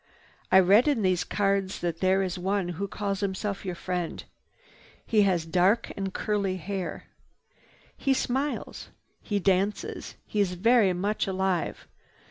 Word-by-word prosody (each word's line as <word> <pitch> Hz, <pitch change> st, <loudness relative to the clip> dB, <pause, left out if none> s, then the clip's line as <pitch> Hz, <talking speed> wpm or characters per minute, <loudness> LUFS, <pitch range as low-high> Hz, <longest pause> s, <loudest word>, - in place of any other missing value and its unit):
"I 190 Hz, -, +8 dB
read 200 Hz, +8 st, +5 dB
in 270 Hz, -8 st, +2 dB
these 185 Hz, -2 st, +2 dB
cards 195 Hz, -1 st, 0 dB
that 170 Hz, -2 st, -2 dB
there 190 Hz, +1 st, +3 dB
is 185 Hz, -1 st, -3 dB
one 190 Hz, 0 st, -1 dB
who 185 Hz, +3 st, -3 dB
calls 200 Hz, -1 st, -3 dB
himself 200 Hz, 0 st, -3 dB
your 185 Hz, -3 st, -4 dB
friend. 180 Hz, -1 st, -3 dB, 0.8 s
He 215 Hz, -2 st, +3 dB
has 170 Hz, -3 st, 0 dB
dark 185 Hz, +6 st, +2 dB
and 195 Hz, -1 st, -3 dB
curly 200 Hz, -2 st, -1 dB
hair. 190 Hz, +1 st, -4 dB, 0.9 s
He 270 Hz, -1 st, +1 dB
smiles. 270 Hz, +4 st, -2 dB, 0.3 s
He 205 Hz, -, -2 dB
dances. 195 Hz, +1 st, -1 dB
He 210 Hz, -, -3 dB
is 195 Hz, -3 st, +2 dB
very 225 Hz, +1 st, +4 dB
much 200 Hz, +4 st, -1 dB
alive. 190 Hz, -2 st, -1 dB
195 Hz, 140 wpm, -27 LUFS, 185-205 Hz, 0.9 s, I